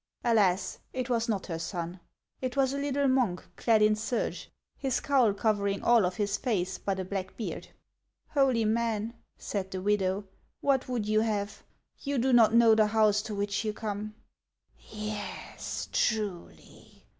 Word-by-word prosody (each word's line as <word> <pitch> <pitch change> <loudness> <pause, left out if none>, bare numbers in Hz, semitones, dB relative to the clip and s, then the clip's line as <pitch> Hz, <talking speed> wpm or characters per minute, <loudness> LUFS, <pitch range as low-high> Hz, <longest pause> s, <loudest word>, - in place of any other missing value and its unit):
Alas! 205 -6 +2
it 255 -1 -3
was 230 0 +1
not 200 -4 -1
her 165 -3 -4
son. 170 +1 -4 0.4
It 255 0 -3
was 270 -1 +3
a 280 - -2
little 280 0 +1
monk 250 -9 +1
clad 220 -2 +3
in 215 0 +4
serge, 220 +3 -3 0.3
his 270 -3 -1
cowl 260 -6 +3
covering 200 -1 0
all 235 -6 +5
of 180 - -4
his 205 +1 0
face 190 -7 -1
but 195 -1 -2
a 185 - -3
black 190 0 -5
beard. 225 - -5 0.3
" - - -52
Holy 265 -6 +3
man," 225 0 0 0.2
said 195 -2 -4
the 190 - -4
widow, 195 0 +1 0.2
" - - -35
what 275 -2 +1
wrould 245 -4 -2
you 215 +1 +2
have? 205 -2 -2 0.4
You 280 0 -2
do 255 +2 +2
not 230 -3 +6
know 230 -1 +7
the 215 -1 +4
house 210 -1 +3
to 215 -1 -6
which 200 +1 -1
you 215 -1 -1
come." 215 0 -5 0.4
" - - -31
Yes, 210 -1 -5
truly 195 - -3
215 Hz, 170 wpm, -29 LUFS, 200-235 Hz, 0.4 s, know